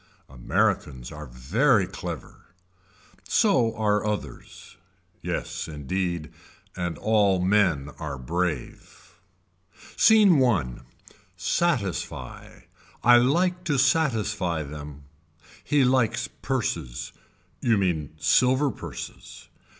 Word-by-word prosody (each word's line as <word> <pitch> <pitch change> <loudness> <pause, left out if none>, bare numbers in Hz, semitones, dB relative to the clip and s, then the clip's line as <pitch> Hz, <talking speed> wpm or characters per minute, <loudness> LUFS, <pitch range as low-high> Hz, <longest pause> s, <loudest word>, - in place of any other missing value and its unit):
Americans 65 0 -1
are 75 -1 -8
very 95 - +2
clever. - - -8 0.8
So 115 -2 +2
are 105 -1 +1
others. 105 - -6 0.5
Yes - - -4
indeed. 80 +2 -3 0.4
And 90 -2 -3
all 105 -4 +2
men 90 -7 +2
are 75 -4 -5
brave. 80 +1 -4 0.8
Scene 200 -10 +6
I. 80 - 0 0.6
Satisfy. 100 - -2 0.4
I 120 0 +7
like 175 +9 +2
to 145 -5 +1
satisfy 110 - +1
them. 75 0 -9 0.6
He 145 -2 +2
likes 125 -3 +1
purses. 85 - -3 0.5
You 115 -3 +3
mean 80 -6 -1
silver 130 - +3
purses. - - -9
95 Hz, 90 wpm, -25 LUFS, 75-125 Hz, 0.8 s, I